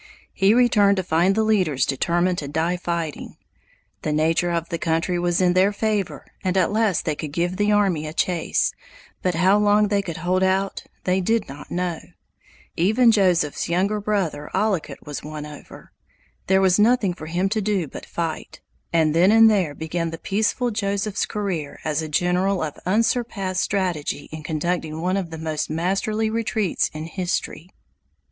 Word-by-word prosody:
He 195 +3 +3
returned 210 -5 +4
to 190 - 0
find 175 +3 +2
the 220 - +2
leaders 185 -11 +2
determined 175 +6 0
to 145 - -5
die 160 +5 0
fighting. 170 -4 -4 0.6
The 155 - -2
nature 160 +3 +1
of 170 -1 -2
the 170 -2 -3
country 165 +2 0
was 175 0 +1
in 180 -1 +3
their 190 +2 +4
favor 210 -2 -2 0.2
and 185 0 0
at 185 0 +2
least 215 -5 +1
they 155 - 0
could 150 0 -6
give 175 +4 -1
the 205 0 +2
army 190 -7 +2
a - - -5
chase, 170 -1 0 0.5
but 180 -2 0
how 190 +5 +4
long 210 0 +3
they 200 -1 +2
could 175 -4 -6
hold 180 +3 0
out 190 +1 0 0.2
they 185 +1 +1
did 225 +3 0
not 140 +2 -10
know. 175 -2 -2 0.8
Even 220 +7 +4
Joseph's 180 -8 +1
younger 195 +5 0
brother 185 -8 -2
Ollicut 195 -4 -1
was 145 -2 -5
won 150 0 -6
over. 150 -1 -12 0.6
There 190 0 +4
was 190 0 +3
nothing 220 -3 +3
for 155 -3 -9
him 175 +4 0
to 215 +2 0
do 195 -5 0
but - - -10
fight; 165 -2 -4 0.3
and 160 -2 +2
then 175 +5 +5
and 225 0 +7
there 180 -8 0
began 165 +2 -3
the 165 - -6
peaceful 220 +6 0
Joseph's 200 -1 -1
career 185 -9 -4
as 155 0 0
a 155 - -5
general 180 +4 +1
of 150 -2 -4
unsurpassed 205 -3 0
strategy 175 -7 -2
in 155 0 -7
conducting 160 +1 -2
one 180 +3 0
of 190 -4 -2
the 160 - -7
most 155 -1 -3
masterly 195 +7 -1
retreats 220 -4 0
in 155 0 -6
history. 175 -1 -3
180 Hz, 175 wpm, -23 LUFS, 160-200 Hz, 0.8 s, and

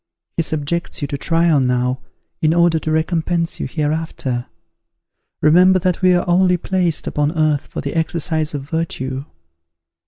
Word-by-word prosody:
He - - +1
subjects 155 +1 -2
you - - -1
to - - -2
trial 165 -2 +2
now, 125 0 0 0.4
in 160 +1 +2
order 170 -1 +3
to 155 - -3
recompense 165 +1 0
you - - -2
hereafter. 150 -5 -2 1.0
Remember 180 +4 +6
that 180 0 -1
we 185 -1 +5
are 175 - 0
only 180 0 +3
placed 175 -2 -1
upon 150 +1 0
earth 155 -2 +1
for - - -6
the 140 - -4
exercise 160 -1 0
of 140 -1 -6
virtue." 140 -5 -3
160 Hz, 150 wpm, -19 LUFS, 145-170 Hz, 1.0 s, Remember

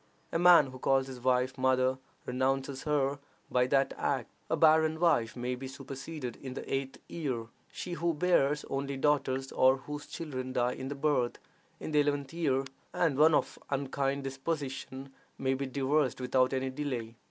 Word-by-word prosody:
A 165 - 0
man 175 -6 +7
who 130 - -10
calls 135 +1 +2
his 130 -2 -8
wife 125 +1 +1
"mother," 130 0 +2 0.3
renounces 135 +2 -1
her 140 -2 +1 0.3
by 125 0 +3
that 135 +1 +2
act. - - -1 0.2
A - - +1
barren 160 0 +4
wife 150 -10 +2
may 125 0 -2
be 130 +1 -6
superseded 135 0 -7
in 130 -2 -7
the - - -5
eighth 135 0 -2
year: 130 -9 -3 0.2
she 180 - -5
who 170 -1 0
bears 150 -3 +2
only 135 0 -3
daughters, 135 -2 +1
or 130 +1 +4
whose 145 +2 -7
children 130 -5 -5
die 125 0 +1
in 130 - -6
the 140 - -4
birth, 140 -4 +1 0.4
in - - -5
the 150 - +4
eleventh 145 -1 0
year; 140 -6 +1 0.3
and 165 -6 +2
one 155 +2 +6
of - - 0
an 140 -1 0
unkind 140 0 -1
disposition 135 -1 -4 0.2
may 130 0 +1
be 135 +1 -2
divorced 135 +1 +1
without 130 0 +2
any 130 0 -1
delay. 130 -5 -4
135 Hz, 175 wpm, -31 LUFS, 130-150 Hz, 0.4 s, man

